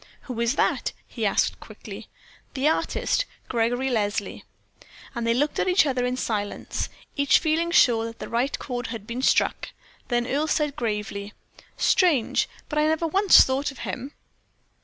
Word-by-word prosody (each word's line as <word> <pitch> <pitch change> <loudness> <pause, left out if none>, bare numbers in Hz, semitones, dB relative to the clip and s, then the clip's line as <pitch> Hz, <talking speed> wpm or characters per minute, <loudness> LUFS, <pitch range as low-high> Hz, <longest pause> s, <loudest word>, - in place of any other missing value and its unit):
"Who 250 -3 -6
is 235 +4 +1
that?" - - 0
he - - -2
asked - - +1
quickly. - - -10 0.5
"The 270 +2 +1
artist, - - 0 0.2
Gregory 245 +3 0
Leslie." 210 -3 -2 0.7
And 235 -2 -3
they 230 - +3
looked 290 +4 0
at - - +1
each 365 -2 +4
other 255 -3 0
in 250 0 -2
silence, 210 -5 -3 0.3
each 280 -2 +4
feeling 325 +1 0
sure 235 -9 +4
that 230 0 -7
the - - -7
right 245 +4 0
chord 245 -2 -4
had 230 -3 -6
been 235 +3 -4
struck. - - +2 0.4
Then 240 -1 0
Earle 285 +5 0
said, 300 -2 0
gravely: 210 -2 -3 0.4
"Strange! 310 - +2 0.2
but 300 - -1
I 305 - +3
never 315 +1 +1
once 385 +4 +6
thought 270 +2 -1
of 270 - -11
him." 265 +3 -5
255 Hz, 160 wpm, -25 LUFS, 230-300 Hz, 0.7 s, once